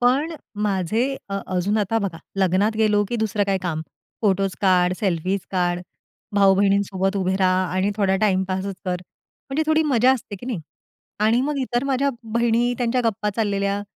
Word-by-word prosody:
पण 270 +7 +2 0.3
माझे 205 +2 +1 0.2
अ, 195 0 -2
अजून 185 +4 0
आता 210 +2 +1
बघा 195 -6 -3 0.2
लग्नात 195 +3 +2
गेलो 210 -1 +3
की 240 - -1
दुसरं 215 -2 0
काय 195 -1 +1
काम 160 -3 -2 0.4
फोटोस 195 -2 +2
काढ, 180 -2 +3
सेल्फी 185 -1 0
काढ, 175 -2 0 0.6
भाऊ-बहिणींसोबत 195 0 +3
उभे 190 -1 0
रहा 185 -1 +2
आणि 185 +2 +1
थोडा 195 -2 +2
टाईमपासच 190 -1 0
कर, 180 -1 -1 0.5
म्हणजे 290 +4 +1
थोडी 315 0 +3
मजा 260 -4 +4
असते 225 -5 -5
की 220 - -10
नाही 230 -10 -3 0.6
आणि 225 +3 +3
मग 290 +2 -1
इतर 255 -1 -1
माझ्या 275 0 +1 0.3
बहिणी 235 +1 +2
त्यांच्या 245 0 +1
गप्पा 210 -2 0
चाललेल्या, 200 -2 0
200 Hz, 160 wpm, -22 LUFS, 190-230 Hz, 0.6 s, मजा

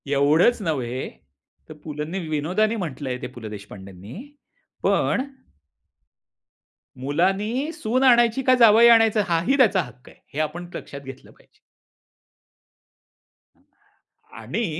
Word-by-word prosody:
एवढंच 150 - +3
नव्हे 130 -8 -3 0.7
तर - - -8
पुलंनी 150 +4 -5
विनोदाने 180 +9 0
म्हटलंय 145 - -4
ते - - -4
पु. - - -13
ल. 110 -2 -8
देशपांडेंनी 100 -1 -11 0.7
पण. - - +1 1.8
मुलांनी 195 - -1
सून 250 +1 -1
आणायची 240 -1 +4
का 255 - +4
जावई 230 0 +7
आणायचं 225 -2 +5
हाही 175 +11 +1
त्याचा 205 -8 +4
हक्क 125 -3 -13
आहे. - - -20
हे 145 - -4
आपण 170 +3 -3
लक्षात 140 - -8
घेतलं 135 -1 -12
पाहिजे. - - -27 2.8
आणि 140 - -3
170 Hz, 110 wpm, -23 LUFS, 135-225 Hz, 2.8 s, जावई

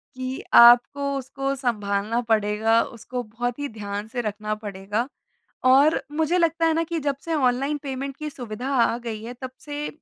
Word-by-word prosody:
कि 255 +1 -4 0.2
आपको 240 +4 +7 0.2
उसको 275 +1 -3
सँभालना 215 -2 -1
पड़ेगा, 220 +1 +3
उसको 245 +1 -6
बहुत 240 +3 -4
ही 285 0 -3
ध्यान 205 +1 -4
से 245 +1 -3
रखना 215 -1 -3
पड़ेगा। 205 +5 -3 0.6
और 275 +5 +5
मुझे 320 +3 +1
लगता 330 -1 +2
है 325 - +3
ना 330 - +1
कि 330 0 -3
जब 285 -1 -1
से 330 -1 -2
ऑनलाइन 275 +1 +1
पेमेंट 275 0 -5
की 305 0 -5
सुविधा 245 -1 -6
आ 235 -1 +3
गई 225 -3 -6
है 245 +2 -6
तब 260 - -4
से 295 0 -5
250 Hz, 175 wpm, -24 LUFS, 220-280 Hz, 0.6 s, आपको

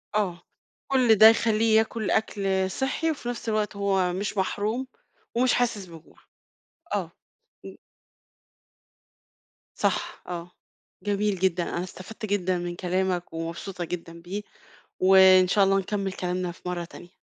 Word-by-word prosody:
آه. 185 -5 0 0.5
كل 255 -4 +4
ده 215 +1 +9
يخليه 225 -1 +3
ياكل 220 -1 0
أكل 195 -3 0
صحّي، 275 +7 -1
وفي 255 -5 -5
نفس 235 -1 -4
الوقت 215 -1 -1
هو 195 -3 +1
مش 205 +2 -3
محروم 215 +7 -1 0.5
ومش 250 +1 +3
حاسس 230 -5 0
بجوع، 165 -3 -15 0.8
آه. - - -2 0.5
إمم. - - -9 2.0
صح. - - -1
آه. 175 0 -6 0.5
جميل 205 -1 0
جدًا. 180 -1 +1
أنا 175 - -3
استفدت 185 +4 -8
جدًا 185 -3 0
من 175 0 -4
كلامك 180 -1 -1
ومبسوطة 170 +2 -5
جدًا 170 -1 -7
بيه. 190 +4 -5 0.6
وإن 185 -1 +7
شاء 200 +1 +4
الله 195 0 +3
نكمل 195 0 -2
كلامنا 180 -1 -3
في - - -20
مرّة 175 -1 -3
تانية. 175 +1 -13
190 Hz, 130 wpm, -26 LUFS, 180-215 Hz, 2.0 s, ده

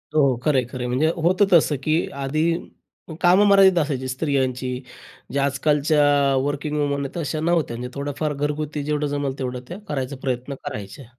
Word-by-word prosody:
हो, 155 - +5
हो. 125 - 0
खरंय-खरंय 130 -3 0
म्हणजे 130 +6 +1
होतं 180 +4 +3
तसं 155 -3 +5
की 155 +3 +1 0.2
आधी 155 +4 0 0.8
कामं 185 +4 +5
मर्यादित 195 -2 +6
असायची 135 -3 -2
स्त्रियांची. 130 -2 -1 0.5
जे 140 - +1
आज-कालच्या 145 +2 +2 0.4
वर्किंग 145 +1 -2
वुमन 140 -1 0
आहेत 140 - -7
अशा 155 +1 -3
नव्हत्या 160 -7 0
म्हणजे 125 +1 -6
थोडंफार 145 +2 -2
घरगुती 150 +1 -3
जेवढं 150 0 -1
जमेल 140 -1 -2
तेवढं 125 -1 -3
त्या 180 +4 -7
करायचा 135 -2 -3
प्रयत्न 130 +1 -3
करायच्या. 105 +6 -7
145 Hz, 155 wpm, -22 LUFS, 130-155 Hz, 0.8 s, मर्यादित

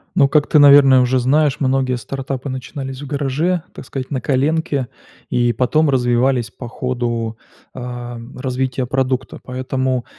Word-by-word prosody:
Ну, 140 - +5
как 150 +1 +2
ты, 155 - +4
наверное, 140 -2 +7
уже 125 +1 +2
знаешь, 140 +3 +2
многие 130 -1 +1
стартапы 135 +2 -5
начинались 135 +1 -6
в - - -6
гараже, 150 +5 -1
так - - -10
сказать, 130 +1 -6
на 130 -3 -2
коленке, 140 -1 0 0.4
и 120 -1 +1
потом 150 +6 +2
развивались 125 -2 +1
по 120 +4 -9
ходу, 120 -2 -3 0.4
а, 120 -1 -6 0.2
развития 130 0 -2
продукта. 130 0 -2
Поэтому, 130 0 -2
130 Hz, 140 wpm, -19 LUFS, 125-140 Hz, 0.4 s, наверное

